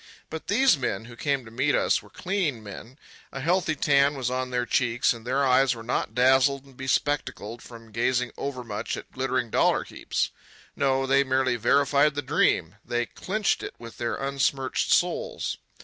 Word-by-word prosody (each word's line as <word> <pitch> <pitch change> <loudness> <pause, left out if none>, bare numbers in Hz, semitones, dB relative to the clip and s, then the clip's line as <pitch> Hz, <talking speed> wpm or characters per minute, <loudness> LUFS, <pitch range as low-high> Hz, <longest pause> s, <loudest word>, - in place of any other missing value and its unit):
But 160 - -6
these 230 - +4
men 110 -4 -2
who 120 0 -11
came 140 0 -1
to 115 - -12
meet 135 +5 +1
us - - +2
were - - -17
clean 175 - -2
men. 110 +6 -10 0.3
A 135 - -6
healthy 165 +2 +1
tan 140 0 +3
was 125 -2 -2
on 130 0 -2
their 125 -1 -1
cheeks, 120 0 +2
and 115 0 -11
their 135 +2 +2
eyes 130 -1 +4
were 115 - -9
not 120 - -2
dazzled 130 +2 +4
and 135 -2 -18
bespectacled 130 -4 -2
from 115 -2 -13
gazing 125 +2 0
overmuch 120 -6 -4
at - - -10
glittering 130 -3 -1
dollar - - +3
heaps. - - -2 0.4
No, 135 -1 +1
they 135 +1 +4
merely 130 -1 +1
verified 140 +4 +3
the 145 - -2
dream. - - +1
They 120 0 -1
clinched 210 - -1
it - - -7
with 115 -1 -11
their 120 -1 -1
unsmirched 135 -1 -1
souls. - - 0
130 Hz, 175 wpm, -26 LUFS, 120-140 Hz, 0.4 s, these